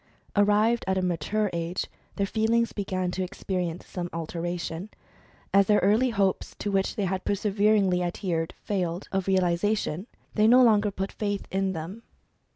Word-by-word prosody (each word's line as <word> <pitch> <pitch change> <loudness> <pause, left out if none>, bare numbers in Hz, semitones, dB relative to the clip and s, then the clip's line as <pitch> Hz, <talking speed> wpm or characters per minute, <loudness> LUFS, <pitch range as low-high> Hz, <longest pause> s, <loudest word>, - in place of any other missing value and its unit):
Arrived 210 +3 +3
at 190 0 +1
a - - +1
mature 180 +5 0
age, 170 +1 -2 0.3
their 200 - +1
feelings 225 +3 +1
began 185 -3 -2
to 185 - -3
experience 180 -2 -3
some 175 -1 -5
alteration. 170 +2 -4 0.6
As 200 -1 +5
their 210 - +5
early 215 +7 +3
hopes, 200 -4 0
to 205 - -3
which 195 -1 0
they 205 - 0
had 185 0 -2
perseveringly 200 -2 +2
adhered, 175 -2 -2
failed 180 -3 -2
of 195 -1 -1
realisa 190 +2 +2
tion, 185 +3 -4 0.3
they 215 0 +4
no 250 +2 +7
longer 210 -3 +4
put 195 0 -4
faith 205 -2 -3
in 190 0 0
them. 175 +7 -6
195 Hz, 160 wpm, -27 LUFS, 180-210 Hz, 0.6 s, no